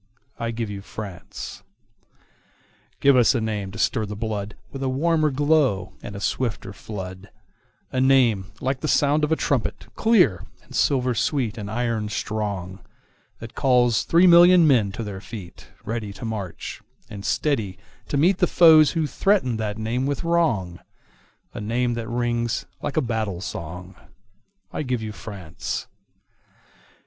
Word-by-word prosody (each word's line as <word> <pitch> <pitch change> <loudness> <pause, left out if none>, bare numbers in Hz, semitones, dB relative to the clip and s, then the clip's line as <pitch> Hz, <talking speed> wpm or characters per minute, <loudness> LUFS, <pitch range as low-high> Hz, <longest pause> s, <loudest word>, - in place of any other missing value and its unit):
I 115 0 -2
give 115 -2 -3
you 100 -1 -6
France! 100 -3 -8 1.4
Give 140 -1 +6
us 125 +1 +5
a - - +2
name 105 -3 -3
to 100 - -9
stir 110 +2 0
the 105 0 -6
bloodWith 105 +4 -5
a 135 - 0
warmer 155 +3 +2
glow 140 - +1
and 105 - -8
a - - -5
swifter 110 -2 -2
flood,—A 100 +4 -8
name 125 -8 +4
like 130 0 -1
the 155 - -3
sound 145 +1 +3
of 150 - +1
a - - +5
trumpet, 120 -9 -1
clear, 185 - +3 0.2
And - - -16
silver 130 -3 +2
sweet, 120 0 0
and 105 -3 -6
iron 115 -2 -1
strong, 100 -3 -3 0.6
That 115 0 -10
calls 125 -4 +3
three 170 +2 +4
million 175 0 +8
men 120 -9 +3
to 115 - -4
their 100 -3 -6
feet, 100 -6 -10 0.2
Ready 110 -2 -3
to 120 - -8
march, 105 -6 -5 0.3
and 100 -1 -9
steady 105 -2 0 0.3
to 145 - -1
meetThe 180 +4 +3
foes 160 -3 +7
who 165 -2 0
threaten 150 - +1
that 105 -1 -3
name 120 +4 -1
with 145 +2 -2
wrong,—A 115 - -3
name 120 +3 0
that 115 -1 -4
rings 120 -1 -1 0.2
like 145 - -4
a - - +4
battle 110 -7 -2
song.I 95 - -9
give 125 -5 -2
you 110 - -4
France! 100 -7 -6
115 Hz, 145 wpm, -23 LUFS, 105-140 Hz, 1.4 s, million